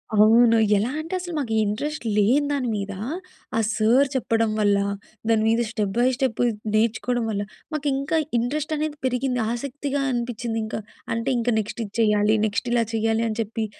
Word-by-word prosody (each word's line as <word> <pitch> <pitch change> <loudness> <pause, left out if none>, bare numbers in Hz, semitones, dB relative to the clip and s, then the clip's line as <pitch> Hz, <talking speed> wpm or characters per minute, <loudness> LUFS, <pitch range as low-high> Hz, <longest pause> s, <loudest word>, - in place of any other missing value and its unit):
అవును. 225 +2 +6 0.2
ఎలా 225 +6 0
అంటే 325 +3 -6
అసలు 350 -1 -6
మాకు 235 -6 -2
ఇంట్రెస్ట్ 255 +8 -3
లేని 255 +8 +3
దాని 260 -4 -1
మీద, 200 0 -4 0.6
ఆ - - +3 0.2
సార్ 240 +6 +4
చెప్పడం 225 -3 +1
వల్ల 205 -1 +3 0.5
దాని 220 -1 +3
మీద 230 +1 +3
స్టెప్ 210 -4 -1
బై 240 - +4
స్టెప్ 260 -5 -1 0.4
నేర్చుకోవడం 235 +2 +1
వల్ల, 205 -1 -1 0.3
మాకు 300 -1 -2
ఇంకా 275 +4 0 0.2
ఇంట్రెస్ట్ 295 +6 -1
అనేది 305 0 -2
పెరిగింది 250 0 0
ఆసక్తిగా 280 +3 -3
అనిపించింది 235 -1 -2
ఇంకా. 215 - -4 0.4
అంటే 230 +3 -1
ఇంకా 235 0 +1
నెక్స్ట్ 215 +2 -4
ఇది 200 - -13
చేయాలి, 210 0 +3
నెక్స్ట్ 210 +3 -2
ఇలా 235 -1 +3
చేయాలి 225 0 +1
అని 215 - -4
చెప్పి. 225 0 -3
235 Hz, 165 wpm, -24 LUFS, 215-270 Hz, 0.6 s, అవును